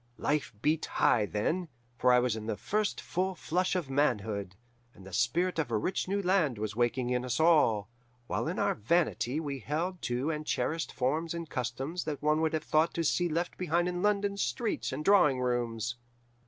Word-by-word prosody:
Life 150 0 0
beat 155 +1 +1
high 105 -3 +2
then, 165 - -1 0.3
for 125 +1 +3
I 125 - +6
was 125 -2 +2
in 110 0 -6
the 110 - -2
first 210 0 -1
flush 185 0 -1
of 175 -6 -1
manhood, 110 -9 0 0.4
and 95 - -14
the 95 - -11
spirit 165 - +1
of 150 -6 0
a 115 - +1
rich 180 - -1
new 200 +1 -1
land 175 - +2
was 110 0 -3
waking 120 +1 0
in 125 0 0
us 125 +3 -2
all, 150 -11 +4 0.4
while - - -2
in - - -2
our - - +2
vanity 150 +1 0
we 140 -4 -4
held 165 - -3
to 125 +6 0
and 150 -1 -3
cherished 160 +2 -1
forms 155 +6 -1
and 170 -1 -5
customs 135 +7 -3
that 150 -3 -3
one 150 +1 +3
would 160 0 +1
have 155 - -1
thought 155 +2 +2
to 170 - 0
see 175 +3 +1
left 170 +3 -2
behind 175 0 +1
in 180 0 -2
London 205 -1 +1
streets 225 +3 -1
and 150 - -4
drawing 175 -10 +5
rooms. 120 -2 -1
150 Hz, 195 wpm, -30 LUFS, 120-175 Hz, 0.4 s, I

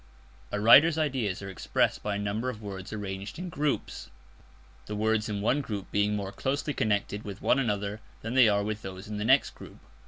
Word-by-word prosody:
A 105 - -1
writer's 145 +9 +7
ideas 130 - -1
are 95 - -6
expressed 95 - 0
by 105 -1 -2
a - - -1
number 105 +4 -2
of 115 -4 -6
words 95 -2 -7
arranged 100 -1 -5
in 180 +1 -5
groups, 150 - -2 0.8
the 105 - -4
words 110 0 +1
in 100 -1 -2
one 130 +7 +2
group 105 -7 -6
being 105 0 +1
more 100 -2 -3
closely 140 +7 -2
connected 105 -2 -1
with 100 -1 -7
one 135 - +3
another 105 -3 -2 0.2
than 115 +2 -3
they 130 -4 +6
are 100 0 +2
with 105 +1 -3
those 95 0 -8
in 105 0 -5
the 105 - -2
next 135 +4 +4
group. - - -13
105 Hz, 205 wpm, -28 LUFS, 100-125 Hz, 0.8 s, writer's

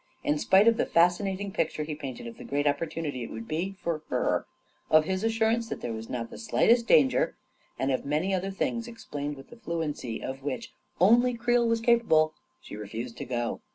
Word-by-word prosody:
In 295 0 +1
spite 200 -6 +5
of 230 0 +5
the - - +1
fascinating 190 +3 +2
picture 155 -3 -1
he 150 0 -4
painted 135 -6 -7
of 115 -1 -9
the - - -8
great 145 +1 -1
opportunity 145 -1 -1
it - - -6
would 115 0 -7
be 180 +5 -2
for 165 -3 -1
her, - - 0 0.4
of 155 0 +5
his 190 +3 -1
assurance 225 +1 +1
that - - -5
there 120 - -3
was 110 0 -7
not 115 -2 -4
the - - -9
slightest 235 +1 +3
danger, 140 -4 +4 0.4
and 135 +1 0
of 130 - 0
many 155 +7 0
other 190 +1 -1
things 230 +4 -2
explained 145 -11 -6
with 135 - -13
the 240 - -12
fluency 155 - -3
of 135 +1 -6
which 135 -1 -4 0.3
only 240 +7 +5
Creel 240 0 +2
was 230 0 +1
capable, 225 -10 +4 0.3
she - - -9
refused 115 +3 -6
to - - -5
go. 120 -2 -2
165 Hz, 200 wpm, -28 LUFS, 135-225 Hz, 0.4 s, spite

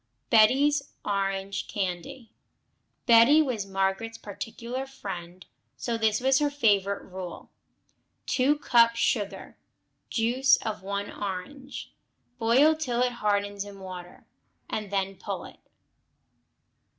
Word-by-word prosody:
Betty's 270 +7 +5 0.2
Orange 195 -1 -2
Candy 205 +6 -4 0.7
Betty 235 +5 +7
was 245 -10 0
Margaret's 195 +4 -1
particular 235 +5 -6
friend, 185 -8 -8 0.3
so 235 - -2
this 220 -1 +2
was 265 +1 +3
her 295 -1 +2
favorite 205 -8 +1
rule: 185 -1 -8 0.7
2 265 +3 +2
cups 230 -4 +4
sugar. 200 -4 -1 0.5
Juice 250 +4 +3
of 215 -3 -4
one 200 +1 -4
orange. 260 +9 -6 0.5
Boil 260 +8 +5
till 250 -6 0
it 250 - +1
hardens 205 -3 -1
in 200 -1 -11
water, 180 -2 -9 0.4
and 215 -2 -4
then 195 -1 -1
pull - - -5
it. - - -13
215 Hz, 110 wpm, -27 LUFS, 195-255 Hz, 0.7 s, Betty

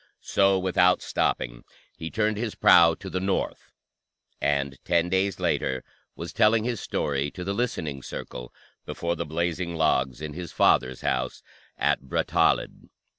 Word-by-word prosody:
So, 95 -1 +3
without 90 -1 +3
stopping, - - -1 0.3
he 80 - -6
turned 110 +2 0
his 110 -1 -3
prow 85 -1 +6
to 95 - -10
the 90 0 -2
north, 95 +1 -2 0.7
and 70 -2 0
ten 85 0 +1
days 95 +1 0
later 65 -1 0 0.3
was - - -7
telling 110 +1 +4
his 120 -2 -2
story 70 0 -1
to 90 - -8
the 100 +2 -2
listening 80 - -2
circle 60 -1 -7 0.3
before 85 0 -3
the 85 - -4
blazing 85 +2 -2
logs 65 -5 +1
in 75 -1 -6
his 85 0 -7
father's 65 0 +2
house 65 0 -2 0.3
at - - +1
Brattahlid. 65 - 0
85 Hz, 145 wpm, -26 LUFS, 70-95 Hz, 0.7 s, prow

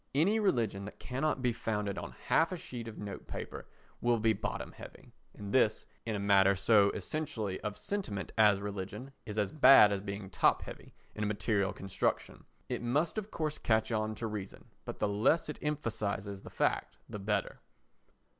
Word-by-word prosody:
Any 195 +10 +3
religion 115 - +1
that 105 - -9
cannot 135 +1 -2
be 125 -1 +2
founded 105 -3 -2
on - - -7
half 165 +2 +3
a 185 - -3
sheet 120 -7 -7
of 110 - -8
note 100 -2 -7
paper - - -6 0.3
will 120 0 +3
be 110 0 +3
bottom 100 - -4
heavy, - - -13 0.2
and 100 -1 -7
this, 110 -5 +3 0.2
in 110 - -1
a - - -2
matter 100 -1 +5
so 100 +1 +5
essentially 120 -11 -3
of 105 0 -4
sentiment 115 - -3
as 105 -3 +5
religion, 100 +6 -5 0.2
is 105 0 -5
as 105 -2 +1
bad 130 -7 +8
as 100 -1 -1
being 100 -1 -6
top - - +3
heavy - - -10 0.2
in 105 - -3
a - - +1
material 100 -1 0
construction. 95 -2 -2 0.2
It - - -3
must 145 - 0
of 210 0 -8
course 155 -5 -3
catch 110 0 +1
on 110 -1 -1
to 115 - -5
reason, 105 -3 -6 0.2
but - - -6
the 105 - +1
less 110 +11 +2
it 150 - -5
emphasises 110 -9 -2
the - - -10
fact - - -1
the 105 - -6
better. 105 +1 -1
110 Hz, 185 wpm, -32 LUFS, 100-130 Hz, 0.3 s, bad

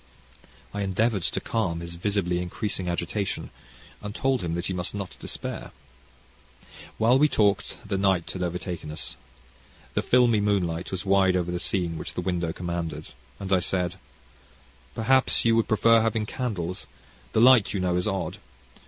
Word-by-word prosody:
I 100 - -3
endeavoured 100 +2 +1
to - - -1
calm 90 -8 -1
his 85 0 -6
visibly 90 0 0
increasing 90 +1 -2
agitation, 85 +4 -2 0.5
and 105 +1 -6
told 135 -2 +1
him 85 -1 -2
that 85 +1 -3
he 95 - -2
must 90 +2 -3
not 100 -3 -5
despair. - - -5 1.3
While 120 +4 +4
we 150 +1 +5
talked 100 -5 +1
the 100 -2 -1
night 95 -4 +2
had 95 - -5
overtaken 90 -2 -3
us. 75 +1 -4 0.8
The - - +1
filmy 120 -4 +4
moonlight 90 -5 0
was 95 +1 -4
wide 95 -1 +4
over 90 -1 0
the 90 - -2
scene 85 -5 0
which - - -7
the - - -1
window 90 -2 -1
commanded, 85 -2 -4 0.3
and 95 -1 -2
I 95 - +5
said: 90 0 -1 1.0
"Perhaps 130 +3 +3
you 115 0 +5
would 115 - +2
prefer 115 +1 +5
having 110 -1 0
candles. 100 -8 -4 0.5
This 110 - +4
light, 125 -5 +7
you 100 - -2
know, 90 -1 +1
is 90 +2 0
odd. 95 -3 -2
95 Hz, 160 wpm, -26 LUFS, 90-105 Hz, 1.3 s, light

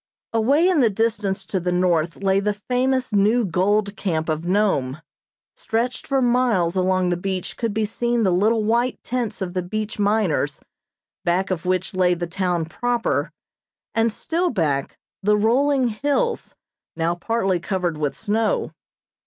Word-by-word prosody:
Away 275 +10 +3
in 365 -4 +3
the 235 - +4
distance 210 -2 -1
to 190 - -2
the 180 0 -1
north 175 -1 +1
lay 195 0 +3
the 205 +1 -1
famous 255 +3 -1
new 215 +4 +3
gold 200 +3 +1
camp 160 -4 -2
of 155 +1 -2
Nome. 180 -9 +1 0.6
Stretched 235 +3 -2
for 270 -1 +1
miles 240 -8 +2
along 185 -1 +2
the 175 - +1
beach 185 0 -3
could 230 -2 -2
be 215 +1 0
seen 235 +2 0
the 190 - +3
little 215 +4 +2
white 235 +3 +1
tents 240 -5 -2
of 175 -1 -5
the 185 - -1
beach 215 +4 -4
miners, 200 -9 +1 0.6
back 185 +3 0
of 180 0 -3
which 185 +1 0
lay 180 -1 +3
the 175 0 -3
town 175 -1 -1
proper, 240 +8 -1 0.6
and 225 0 +2
still 340 +10 -1
back, 150 - -1 0.2
the 210 +1 +3
rolling 255 +4 +2
hills 290 - -1 0.4
now 165 +1 0
partly 190 0 0
covered 180 -2 -2
with 145 -3 -2
snow. 220 +1 0
205 Hz, 155 wpm, -22 LUFS, 180-230 Hz, 0.6 s, the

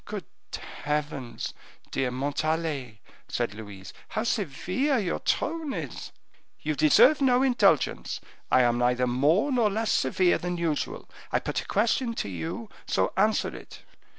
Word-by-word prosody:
"Good - - -6 0.6
heavens! 145 -4 -3 0.4
dear 130 - 0
Montalais," 140 -3 -2 0.3
said - - -2
Louise, 105 -3 -9
"how 215 - -2
severe 225 - 0
your 190 -7 -1
tone 315 -3 -1
is!" - - -6 0.5
"You 155 - -1
deserve 225 - +5
no 255 -1 +4
indulgence, 205 - +2 0.3
I 130 - +6
am 120 0 +2
neither 125 +1 +2
more 145 - +2
nor 240 -5 +3
less 220 +2 0
severe 175 +7 +2
than 180 0 -3
usual. 165 -3 -2 0.2
I - - +3
put - - -2
a - - -12
question 230 +3 +1
to 100 - -3
you, 165 - -5 0.2
so - - +1
answer 215 +3 +2
it." - - -12
165 Hz, 140 wpm, -27 LUFS, -, 0.6 s, I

